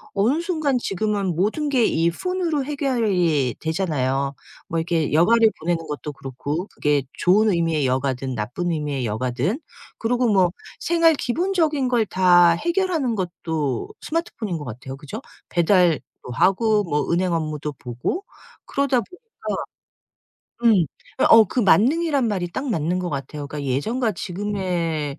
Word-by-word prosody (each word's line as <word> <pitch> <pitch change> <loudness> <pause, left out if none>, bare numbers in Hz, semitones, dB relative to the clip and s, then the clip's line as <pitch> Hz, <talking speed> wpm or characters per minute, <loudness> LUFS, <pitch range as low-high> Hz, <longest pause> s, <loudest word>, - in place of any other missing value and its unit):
어느 230 +10 +2
순간 315 -7 0
지금은 200 -4 -1
모든 215 - 0
게 260 -4 +2
이 165 -5 +2
폰으로 335 - -1
해결이 210 - +1
되잖아요. 140 -5 -1 0.3
뭐 165 - 0
이렇게 165 -2 0
여가를 220 +8 +5
보내는 165 0 -1
것도 150 0 -5
그렇고 140 - -4
그게 145 -2 0 0.2
좋은 210 +4 +4
의미의 165 -5 +1
여가든 130 0 -1
나쁜 120 +12 -2
의미의 145 -5 -2
여가든. 125 - -1 0.4
그러고 240 +1 +1
뭐 185 -3 +4 0.3
생활 335 -1 +4
기본적인 310 -1 0
걸 235 -3 +2
다 175 -3 +5
해결하는 335 - 0
것도 160 - -3
스마트폰인 235 - -3
것 150 - -7
같아요 125 +1 -7
그죠? 150 - -8 0.3
배달도 175 - +3 0.3
하고 210 - +3
뭐 150 -4 -1
은행 180 +1 +1
업무도 155 -2 -2
보고 125 - -4 0.4
그러다 275 -3 +1
보니까 360 - -15 1.4
음. 200 -9 +5 0.4
어 225 -1 +9
그 245 +5 -1
만능이라는 275 - +3
말이 180 -4 -2
딱 265 +9 -4
맞는 175 -3 0
것 180 -2 -3
같아요. 140 +1 -5
그니까 145 0 -6
예전과 220 - 0
지금의 175 -6 -3
180 Hz, 305 characters per minute, -22 LUFS, 150-240 Hz, 1.4 s, 어